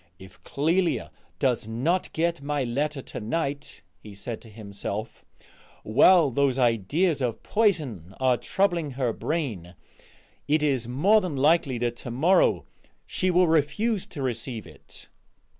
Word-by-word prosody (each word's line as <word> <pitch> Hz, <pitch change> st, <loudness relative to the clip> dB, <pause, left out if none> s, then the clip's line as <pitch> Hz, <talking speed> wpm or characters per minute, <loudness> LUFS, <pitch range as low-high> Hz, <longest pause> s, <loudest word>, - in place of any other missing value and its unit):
"If 95 Hz, 0 st, -15 dB
Clélia 165 Hz, +5 st, 0 dB, 0.3 s
does 125 Hz, -5 st, 0 dB
not 140 Hz, +12 st, -1 dB
get 170 Hz, -1 st, -1 dB
my 145 Hz, 0 st, -1 dB
letter 140 Hz, +3 st, -2 dB
to -, -, -7 dB
night," 140 Hz, +5 st, -4 dB, 0.2 s
he 105 Hz, -2 st, -12 dB
said 110 Hz, +3 st, -6 dB
to 115 Hz, -, -14 dB
himself, 105 Hz, 0 st, -6 dB, 0.6 s
"while 150 Hz, -, +5 dB
those 135 Hz, 0 st, +1 dB
ideas 135 Hz, -, +1 dB
of 120 Hz, -3 st, -2 dB
poison 145 Hz, -, 0 dB
are 130 Hz, -1 st, +3 dB
troubling 170 Hz, -1 st, 0 dB
her 125 Hz, -4 st, 0 dB
brain, 110 Hz, -, -3 dB, 0.7 s
it 150 Hz, +1 st, +2 dB
is 135 Hz, -6 st, +1 dB
more 185 Hz, -, +3 dB
than 180 Hz, -6 st, -4 dB
likely 145 Hz, -2 st, +3 dB
that 120 Hz, 0 st, -2 dB
to 125 Hz, -, -8 dB
morrow 160 Hz, +11 st, +3 dB, 0.4 s
she 185 Hz, -, -1 dB
will 180 Hz, 0 st, +4 dB
refuse 180 Hz, +8 st, +1 dB
to 145 Hz, -5 st, -6 dB
receive 120 Hz, -2 st, -4 dB
it." -, -, -14 dB
140 Hz, 140 wpm, -26 LUFS, 115-165 Hz, 0.7 s, while